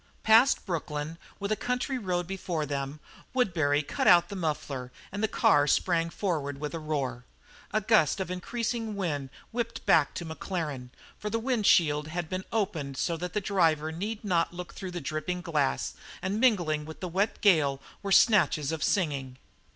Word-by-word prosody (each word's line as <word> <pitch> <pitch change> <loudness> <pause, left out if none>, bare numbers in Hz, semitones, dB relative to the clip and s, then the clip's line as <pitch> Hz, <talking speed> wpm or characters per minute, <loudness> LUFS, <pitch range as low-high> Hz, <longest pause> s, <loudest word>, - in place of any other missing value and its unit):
Past 225 +5 +5
Brooklyn, 155 -2 -3 0.2
with 200 +1 -3
a - - +3
country 250 +3 -2
road 180 -4 -1
before 175 -4 -3
them, 140 +1 -4 0.4
Woodbury 160 - +2
cut - - -1
out 175 -1 +7
the 200 - -6
muffler 145 -7 -3 0.2
and 205 +1 -4
the 220 - +3
car 145 -7 +4
sprang 165 +2 +2
forward 150 -7 -2
with 150 +1 -4
a 165 - -3
roar. 140 -6 -3 0.5
A 215 - +1
gust 205 -5 +3
of 185 -1 -3
increasing 225 +3 -3
wind 150 -9 -2 0.2
whipped 235 0 -3
back 150 -3 +4
to 175 - -4
Maclaren, 160 -6 -4 0.3
for 210 - -3
the 225 - 0
wind 230 -3 0
shield 150 -2 +4
had 170 0 -4
been 185 0 -3
opened 165 -11 -2
so 170 - 0
that 180 +1 -5
the 210 - 0
driver 165 -6 +2
need 205 +7 -4
not 175 -4 +2
look 175 0 -8
through 190 - -6
the 175 -1 -5
dripping 155 +5 -3
glass 150 - 0 0.3
and 195 +3 -2
mingling 175 -12 +2
with 160 +1 -9
the 185 - -4
wet 190 +5 0
gale 150 -9 +4 0.2
were 200 - -4
snatches 190 - +4
of 160 -1 -3
singing. 140 -9 0
175 Hz, 175 wpm, -28 LUFS, 150-200 Hz, 0.5 s, out